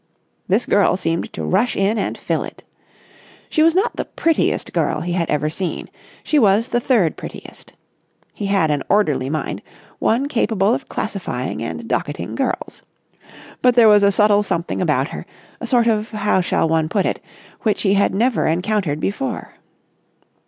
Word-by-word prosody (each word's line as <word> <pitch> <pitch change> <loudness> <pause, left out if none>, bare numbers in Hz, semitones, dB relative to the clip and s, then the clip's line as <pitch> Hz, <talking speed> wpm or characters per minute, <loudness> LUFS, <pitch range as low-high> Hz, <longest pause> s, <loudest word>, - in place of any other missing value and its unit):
This 200 +6 +2
girl 200 -3 +3
seemed 165 -2 -2
to - - -5
rush 210 +6 +1
in 200 +3 +1
and - - -2
fill - - -2
it. - - -10 0.9
She 310 - +2
was 330 +1 +4
not 390 +5 +1
the - - -2
prettiest 330 -1 0
girl 155 -3 0
he 175 +1 -3
had 170 -2 -1
ever 150 0 0
seen. 175 +3 -4 0.3
She 305 - +2
was 215 +2 +3
the 240 - +1
third 230 - +2
prettiest. - - -10 0.6
He 205 - -4
had 195 -6 +2
an 145 -1 0
orderly 150 -11 +2
mind, 155 +1 -3 0.4
one 245 +5 +1
capable 225 -5 +1
of - - -4
classifying - - -4
and - - -5
docketing - - -3
girls. - - -3 0.8
But 250 -1 +4
there 235 -2 +7
was 210 -1 +6
a 200 0 +4
subtle 210 0 +4
something 185 -4 -2
about 150 -6 +1
her, - - -8 0.3
a - - -5
sort 240 -3 +3
of 220 -1 +1
how 210 -3 +1
shall 175 - +1
one 160 -1 +1
put 195 +2 +1
it, - - -2 0.4
which 215 -2 0
he 195 -2 +3
had 200 0 +3
never 240 +4 +1
encountered 180 -2 0
before. 250 +10 -3
200 Hz, 170 wpm, -20 LUFS, 170-225 Hz, 0.9 s, there